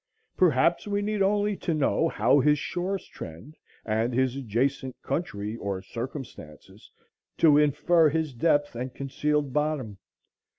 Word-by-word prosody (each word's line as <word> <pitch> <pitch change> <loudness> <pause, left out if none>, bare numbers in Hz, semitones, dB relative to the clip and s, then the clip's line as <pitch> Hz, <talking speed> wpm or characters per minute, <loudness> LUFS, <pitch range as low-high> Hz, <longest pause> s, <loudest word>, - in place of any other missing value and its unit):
Perhaps 170 +2 +3
we 205 0 -1
need 210 0 -1
only 205 +1 +2
to 165 - -2
know 155 +2 +1
how 145 - +3
his 150 +2 +3
shores 185 +5 -3
trend 85 - -10 0.3
and 115 +2 0
his 130 0 +1
adjacent 130 +1 -2
country 105 - -3
or 100 -3 -4
circumstances, 115 - -9 0.5
to 150 -3 +6
infer 150 +3 +3
his 155 -1 -2
depth 145 +3 +1
and 125 +1 -5
concealed 145 0 -1
bottom. 150 -9 -2
145 Hz, 130 wpm, -26 LUFS, 120-165 Hz, 0.5 s, to